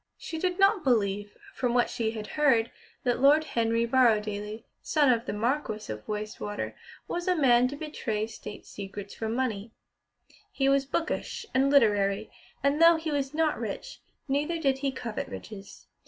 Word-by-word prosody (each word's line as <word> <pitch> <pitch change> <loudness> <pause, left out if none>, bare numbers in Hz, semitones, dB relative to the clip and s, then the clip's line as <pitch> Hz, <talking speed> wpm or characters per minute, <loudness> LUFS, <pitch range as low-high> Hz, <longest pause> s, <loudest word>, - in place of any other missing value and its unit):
She 320 - -6
did 360 +1 0
not 390 -1 +4
believe, 205 -5 0 0.2
from 245 -2 -1
what 245 - +4
she 225 -2 -2
had 220 -1 -5
heard, 245 -4 +2 0.3
that 245 -1 +1
Lord 290 +4 +6
Henry 230 -4 0
Borrowdaile, 215 -3 +1 0.2
son 290 -5 +3
of 230 +1 -3
the - - -1
Marquis 215 - -2
of 105 - -10
Wastwater, 210 0 -4 0.3
was 350 +1 -3
a 365 - +3
man 250 -5 +5
to 275 - -5
betray 250 -8 -3
State 210 -2 -9
secrets 200 0 -8
for 220 - -4
money. 225 -3 -2 0.8
He 270 - 0
was 275 0 +3
"bookish" 340 +8 -2
and 270 +1 +3
literary, 210 -6 +3 0.3
and 280 +3 +2
though 335 0 +8
he 320 -1 -3
was 280 0 -2
not 315 -1 +1
rich, - - -6 0.3
neither 295 +5 0
did 275 -4 +1
he 275 0 0
covet 240 -4 -5
riches. 200 -3 -10
245 Hz, 165 wpm, -28 LUFS, 215-285 Hz, 0.8 s, though